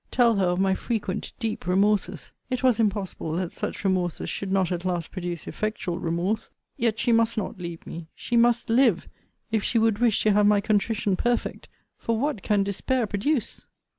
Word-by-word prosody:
Tell 235 -3 +3
her 190 - +3
of 180 +1 0
my 190 0 +3
frequent 210 -2 -3
deep 220 -6 -3
remorses 190 -3 +1 0.2
it 255 -1 -2
was 250 -3 +4
impossible 200 -6 -1
that 175 +1 -2
such - - -4
remorses 185 -3 0
should 195 -1 -4
not 190 -2 +2
at 175 -1 -2
last 175 -3 -2
produce 175 -3 -4
effectual 200 -5 -3
remorse 175 +6 -1 0.3
yet 225 -2 0
she 235 - +1
must 230 0 +3
not 200 -2 -3
leave 170 -2 -7
me 165 -1 -7
she 240 - -3
must 235 0 +4
live, 230 -6 +3 0.4
if 220 -2 +1
she 235 - +1
would 225 -2 +3
wish 235 -4 +3
to 215 - +4
have 205 0 +4
my 210 -1 +5
contrition 210 -1 +1
perfect 240 +5 -1 0.3
For 230 -1 -1
what 280 -3 -1
can 205 -1 +2
despair 230 +5 0
produce? 215 +5 -2
205 Hz, 185 wpm, -25 LUFS, 185-230 Hz, 0.4 s, my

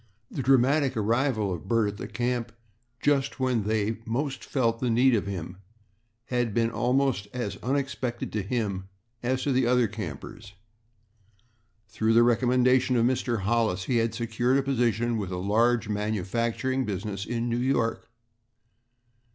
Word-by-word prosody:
The - - -3
dramatic 135 +1 +3
arrival 110 -2 +1
of 85 -4 -7
Bert 115 -2 +2
at 100 - -8
the - - -6
camp 120 -1 -2 0.5
just 140 -1 +1
when 125 -5 +1
they 110 0 0
most 130 +4 -3
felt 115 -4 0
the 125 - 0
need 125 +3 +4
of 100 -3 0
him 90 -2 -5 0.7
had 120 -4 -1
been 115 0 +2
almost 130 -5 +1
as 120 -5 -3
unexpected 130 -2 -2
to 105 - 0
him 100 -3 -2 0.3
as 130 +1 -1
to 145 - 0
the 130 -1 +2
other 125 -1 +3
campers. 100 +1 -8 1.3
Through 110 +1 0
the 115 +1 +6
recommendation 125 +2 +3
of 115 -1 +3
Mr. 120 -3 0
Hollis, 110 -3 +1
he 120 +5 0
had 115 -1 0
secured 120 +3 +1
a 140 - +1
position 120 -3 +1
with 100 -3 -3
a 90 - -3
large 115 +5 +2
manufacturing 110 +5 -1
business 100 -2 -4
in 120 +1 -2
New 120 0 0
York. 115 -3 0
115 Hz, 150 wpm, -27 LUFS, 110-125 Hz, 1.3 s, the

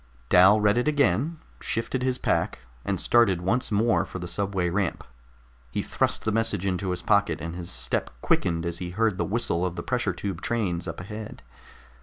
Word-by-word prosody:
Dal 95 +4 +7
read 105 +2 +3
it 125 - -1
again, 145 - +2 0.2
shifted 115 +3 -2
his 130 0 0
pack, - - 0 0.3
and - - -1
started 115 -7 +4
once 115 +8 0
more 110 +3 +3
for - - -7
the 90 -1 -5
subway 95 0 -1
ramp. 90 +1 -1 0.7
He - - -2
thrust - - 0
the 110 - +2
message 110 -3 0
into 95 0 -1
his 90 -1 -3
pocket, 100 -6 +2
and 85 +1 -5
his 90 -1 -6
step - - -2
quickened 85 -2 0
as 85 0 -3
he 90 -1 -4
heard 105 +1 0
the - - +2
whistle 100 -5 0
of 90 -1 -1
the - - -5
pressure 120 -6 0
tube 95 -1 -4
trains 100 -8 -1
up - - -5
ahead. 105 +3 -8
100 Hz, 190 wpm, -26 LUFS, 90-115 Hz, 0.7 s, Dal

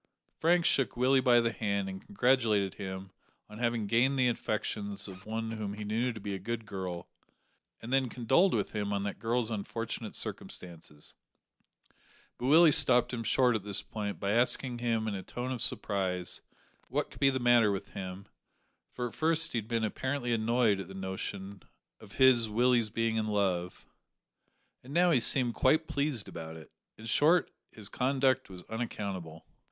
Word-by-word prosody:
Frank 170 +1 +3
shook 135 -3 +2
Willie 130 +2 +4
by 120 -1 +5
the 115 0 +1
hand 100 -3 -2
and 95 0 -7
congratulated 120 - +1
him 95 -1 -7 0.4
on 105 +1 -11
having 120 -2 0
gained 125 +6 +2
the 125 -1 +3
affections 105 -3 -3
of 95 +1 -11
one 110 +1 -3
whom 105 -2 -4
he 105 - -6
knew 115 +4 0
to 110 - -8
be 100 -1 -5
a 95 - -4
good 115 +3 -4
girl, 95 -4 -5 0.8
and 120 +3 -5
then 135 -2 +2
condoled 130 - +2
with - - -1
him 105 -1 -2
on 100 0 -1
that 100 - -4
girl's 115 0 0
unfortunate 110 +1 -4
circumstances; 80 -4 -6 1.3
but 125 - -2
Willie 160 +3 +7
stopped 125 -3 +5
him 115 -1 -3
short 125 +1 +3
at 105 - -2
this 100 -1 -2
point 105 -2 -5
by 100 0 -1
asking 120 +2 +1
him 115 -2 0
in 105 - -2
a 95 - -4
tone 125 +6 -5
of 125 -3 -3
surprise 95 -6 -1 0.5
what - - -2
could - - -13
be 135 - +5
the 130 - 0
matter 120 -3 +4
with 95 - -5
him, 95 +1 -7 0.7
for 125 - -2
at 115 - -10
first 160 +3 +1
he 120 - 0
had 110 - -9
been 115 -1 -1
apparently 120 +2 -2
annoyed 115 -2 +2
at 95 - -6
the 95 - -10
notion 95 +1 -6 0.4
of - - -14
his 125 -4 +4
(Willie's) 120 0 +2
being 115 0 -1
in 110 -1 0
love, 95 -4 -1 1.0
and 135 +4 -9
now 175 0 +4
he 140 - +4
seemed 120 0 +4
quite 155 +7 +3
pleased 140 -6 -2
about 80 -1 -8
it. 80 - -14 0.3
In 110 - -11
short, 155 +9 +3 0.2
his 105 -2 -7
conduct 130 +1 +1
was 90 -2 -8
unaccountable! 100 -8 -5
115 Hz, 180 wpm, -30 LUFS, 100-125 Hz, 1.3 s, Willie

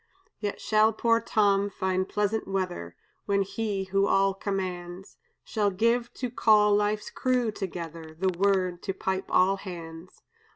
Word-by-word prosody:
"Yet 205 -1 -3
shall 215 +1 +3
poor 230 +1 +2
Tom 205 -3 +2
find 190 -1 -1
pleasant 210 +1 -1
weather 180 - -3 0.3
When 200 -1 +2
He 200 0 -3
who 195 +1 +1
all 195 0 +3
commands 185 -2 -5 0.3
Shall 210 -2 0
give, 230 +5 +1
to 250 -2 -4
call 210 -3 +4
life's 210 0 0
crew 250 -3 0
together, 165 -5 -6
The 185 0 0
word 185 -2 +1
to 195 - -3
pipe 190 0 -2
all 190 +2 +3
hands. 170 -2 -9
195 Hz, 140 wpm, -27 LUFS, 185-210 Hz, 0.3 s, call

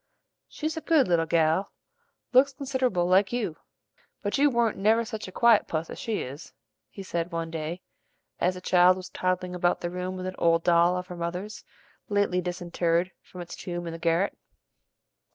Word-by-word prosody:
"She's 310 +1 -4
a 320 - -4
good 315 -5 +3
little 165 -2 +2
gal; 165 +3 +2 0.6
looks 270 +2 +5
consid'able 260 - 0
like 190 +2 +3
you; 220 -10 -2 0.7
but 205 - -1
you 290 +1 +5
warn't 235 -5 +1
never 220 +3 +3
such 220 -3 -6
a - - -8
quiet 230 +1 +4
puss 160 0 -3
as - - -8
she 225 -2 -2
is," 140 +5 -9 0.4
he 195 - -9
said 170 -1 -3
one 165 -1 -3
day, 165 +2 -5 0.6
as 180 +1 +1
the 180 - -8
child 180 0 +5
was 185 -1 -8
toddling 185 0 -2
about 175 0 +1
the 175 - -3
room 180 +1 -4
with 185 - -5
an 185 - -3
old 165 0 +3
doll 175 +1 +4
of 180 - -4
her 180 -1 -8
mother's 180 +5 -5 0.5
lately 205 -3 +1
disinterred 175 0 -1
from 180 - -11
its 175 - -8
tomb 175 -1 -5
in 165 - -5
the 165 - -7
garret. 170 +4 +1
180 Hz, 185 wpm, -27 LUFS, 170-205 Hz, 0.7 s, looks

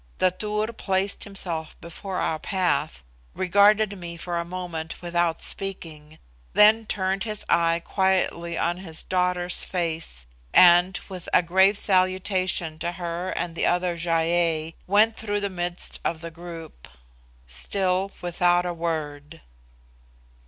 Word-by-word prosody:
The 185 - +3
Tur 210 +3 -3
placed 195 -2 -1
himself 170 -6 -3
before 180 +3 -6
our 160 -3 -1
path, 175 - -1 0.3
regarded 200 +2 +3
me 170 -1 -7
for 170 0 -3
a - - -1
moment 170 -2 -6
without 175 -1 0
speaking, 160 -6 -3 0.4
then 215 +1 +5
turned 190 -1 -1
his 215 -2 -5
eye 170 0 +2
quietly 185 -3 0
on 175 +1 0
his 165 -4 -7
daughter's 180 -1 -1
face, 165 - -3 0.3
and, 175 +1 +6
with 185 -2 -8
a 180 - +5
grave 190 +4 +4
salutation 185 -4 +1
to 175 +1 -2
her 175 +1 -4
and 175 -2 -3
the - - +1
other 180 0 +1
Gy 170 +1 -4
ei, 165 -1 +1
went 215 +3 +4
through 205 -1 -2
the 200 -1 -2
midst 175 0 -2
of 165 -1 -2
the 170 0 -7
group, 165 - -10 0.6
still 185 - 0
without 175 0 +2
a 175 - -2
word. 160 -2 -4
175 Hz, 135 wpm, -25 LUFS, 165-190 Hz, 0.6 s, and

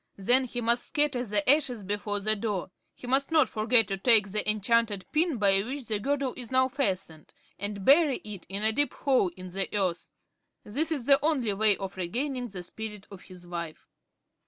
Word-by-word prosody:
Then 245 +7 +3
he 245 0 -5
must 235 +1 +1
scatter 290 -5 +1
the 205 -3 -1
ashes 260 -6 +2
before 205 +1 -3
the 215 +2 +2
door. 205 -4 -4 0.2
He - - -12
must 270 +3 +1
not 320 -2 +4
forget 225 0 +3
to 195 - -2
take 210 -2 +4
the 210 +1 +1
enchanted 215 -1 +1
pin 315 -2 +1
by 195 -2 +3
which 260 +5 -6
the 215 -2 -2
girdle 275 +2 -1
is 245 -3 -7
now 260 0 +2
fastened 190 - -3 0.3
and 205 -1 -5
bury 285 -1 +5
it 205 -4 -9
in 200 +2 -3
a 220 - +4
deep 290 +6 0
hole 260 -9 +1
in 185 0 -9
the 195 +1 -2
earth. 180 -4 -2 0.5
This 300 +10 -1
is 280 -7 -3
the 275 +1 +4
only 270 -9 0
way 210 0 +3
of 195 -1 -7
regaining 245 +8 -3
the 190 -5 -8
spirit 210 +2 -8
of 195 -2 -11
his 180 -2 -14
wife." 170 -2 -7
220 Hz, 195 wpm, -27 LUFS, 195-260 Hz, 0.5 s, bury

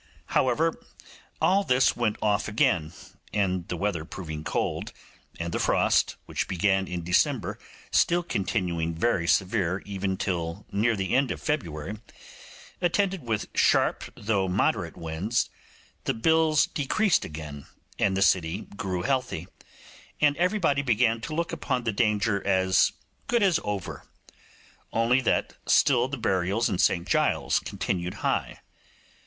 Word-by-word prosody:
However, 155 +6 +2 0.6
all 195 +2 +3
this 125 -6 +3
went 115 -3 0
off 105 -1 +1
again, 105 - +1 0.4
and 95 -4 0
the 90 - -3
weather 95 -4 -1
proving 80 -3 -7
cold, - - -2 0.5
and 85 0 -3
the - - -1
frost, - - +2
which - - -3
began 95 +1 +1
in 90 -1 -4
December, 105 - +1 0.3
still 175 +1 +3
continuing 90 - -1
very 85 -1 +1
severe 95 -1 +1
even 95 -1 -2
till 85 +1 -3
near 110 +3 +2
the 95 +2 -1
end 135 0 +3
of - - -3
February, 100 - -3 0.8
attended 190 +1 +1
with 110 -2 -1
sharp - - +2
though 100 -3 0
moderate 90 -2 0
winds, 85 +8 -1 0.5
the - - 0
bills 160 +4 +3
decreased 175 +7 +1
again, 75 -2 -8 0.3
and 95 -1 +2
the 95 - +4
city 90 +1 +2
grew 95 -3 -3
healthy, 130 - -1 0.7
and 145 -1 +4
everybody 180 -6 +2
began 115 -3 +2
to 155 +6 -5
look 170 +1 -1
upon 130 -6 -2
the 115 - 0
danger 105 -1 +1
as 95 -1 +3 0.4
good 235 -3 +2
as 180 -4 +3
over; 100 -3 -5 0.8
only 120 +3 +3
that 130 - 0
still 125 -3 +4
the 140 +1 -4
burials 100 +1 +1
in 95 - -2
St 85 -2 +2
Giles's - - +2
continued 90 -1 -3
high. - - -1
105 Hz, 135 wpm, -26 LUFS, 90-130 Hz, 0.8 s, the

